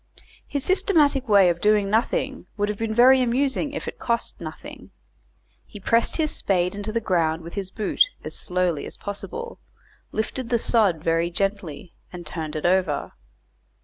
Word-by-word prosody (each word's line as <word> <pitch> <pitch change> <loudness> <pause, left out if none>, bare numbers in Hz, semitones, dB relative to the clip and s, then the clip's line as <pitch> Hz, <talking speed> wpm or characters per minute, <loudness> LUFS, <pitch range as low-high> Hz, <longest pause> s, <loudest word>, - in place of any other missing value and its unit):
His 285 -2 -2
systematic 310 - +3
way 200 -3 +6
of 170 0 -6
doing 210 -1 +3
nothing 225 - -1
would 205 0 0
have 210 - -3
been 225 -1 -1
very 255 +3 +6
amusing 265 +4 0
if 275 - -5
it - - -6
cost 235 -5 -2
nothing. 155 -2 -9 0.7
He - - -12
pressed 230 +4 +1
his 310 -2 0
spade 180 -2 0
into 205 +1 -4
the 230 - 0
ground 170 -6 0
with 170 - -9
his 195 -2 -4
boot 210 +1 -3 0.2
as - - -5
slowly 180 -5 -1
as - - -6
possible, 465 - -6 0.5
lifted 230 +3 -3
the 240 - +3
sod 205 -9 +2
very 165 +1 +1
gently, 190 -3 -3 0.2
and 175 -1 -8
turned 155 0 -5
it 155 - -3
over. 180 -4 +1
205 Hz, 165 wpm, -24 LUFS, 175-240 Hz, 0.7 s, way